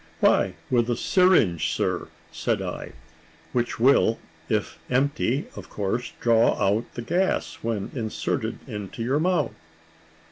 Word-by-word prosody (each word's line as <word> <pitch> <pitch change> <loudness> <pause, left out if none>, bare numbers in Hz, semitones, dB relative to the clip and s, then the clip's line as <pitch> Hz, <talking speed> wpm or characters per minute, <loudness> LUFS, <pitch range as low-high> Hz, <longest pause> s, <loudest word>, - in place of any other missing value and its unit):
"Why, - - +3 0.2
with 120 -1 +3
a 120 - +2
syringe, 115 - +3
sir," - - -1 0.2
said - - -1
I; - - -5 0.6
"which 120 -2 -1
will, 120 -2 +4 0.3
if - - -1
empty, 135 +1 +1
of 100 -3 -9
course 105 +5 -2
draw 115 -1 +4
out 105 +4 +1
the 120 - -4
gas, 180 +10 0
when 110 -4 -2
inserted 110 -5 -3
into 105 +2 -5
your 135 +5 +1
mouth." 180 +2 +1
120 Hz, 130 wpm, -25 LUFS, 110-135 Hz, 0.6 s, will